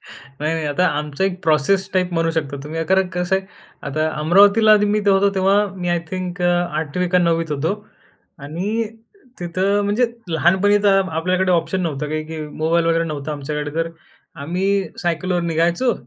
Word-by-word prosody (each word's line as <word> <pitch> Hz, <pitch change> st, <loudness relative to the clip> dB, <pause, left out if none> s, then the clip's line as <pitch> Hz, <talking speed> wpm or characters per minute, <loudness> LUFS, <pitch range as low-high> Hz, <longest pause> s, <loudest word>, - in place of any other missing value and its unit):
नाही, 145 Hz, +4 st, -6 dB
नाही 160 Hz, -1 st, -3 dB
आता 165 Hz, +5 st, +1 dB
आमचा 150 Hz, +4 st, -2 dB
एक 185 Hz, -1 st, -2 dB
प्रोसेस 165 Hz, +5 st, +2 dB
टाइप 180 Hz, -1 st, 0 dB
म्हणू 165 Hz, -1 st, +1 dB
शकता 150 Hz, -4 st, -3 dB
तुम्ही 160 Hz, +2 st, -4 dB
कारण 190 Hz, +1 st, +2 dB
कसं 180 Hz, +2 st, 0 dB
आहे. 190 Hz, 0 st, -5 dB, 0.4 s
आता 155 Hz, +3 st, -1 dB
अमरावतीला 205 Hz, +6 st, +6 dB
मी 210 Hz, +1 st, +2 dB
होतो 200 Hz, 0 st, +4 dB
तेव्हा 190 Hz, +1 st, +2 dB, 0.2 s
मी 180 Hz, -1 st, -3 dB
आय 175 Hz, 0 st, +2 dB
थिंक 185 Hz, -1 st, -4 dB
8वी 175 Hz, -1 st, 0 dB
का 180 Hz, +1 st, +3 dB
9वीत 165 Hz, -2 st, +1 dB
होतो. 150 Hz, +5 st, -1 dB, 0.7 s
आणि 185 Hz, +10 st, -3 dB, 0.6 s
तिथं 185 Hz, +4 st, 0 dB
म्हणजे 215 Hz, +5 st, +2 dB, 0.2 s
लहानपणीचा 195 Hz, +4 st, +3 dB, 0.2 s
आपल्याकडे 185 Hz, +3 st, +1 dB
ऑप्शन 175 Hz, +2 st, 0 dB
नव्हतं 150 Hz, -3 st, -3 dB
काही, 155 Hz, +1 st, -3 dB
की 160 Hz, 0 st, -7 dB
मोबाईल 160 Hz, +3 st, 0 dB
वगैरे 165 Hz, 0 st, +2 dB
नव्हता 150 Hz, -1 st, -4 dB
आमच्याकडे 150 Hz, +1 st, -4 dB
तर 165 Hz, 0 st, -1 dB, 0.5 s
आम्ही 180 Hz, +6 st, -2 dB, 0.3 s
सायकलवर 175 Hz, +1 st, -1 dB
निघायचो 170 Hz, +8 st, +1 dB
175 Hz, 155 wpm, -20 LUFS, 155-190 Hz, 0.7 s, अमरावतीला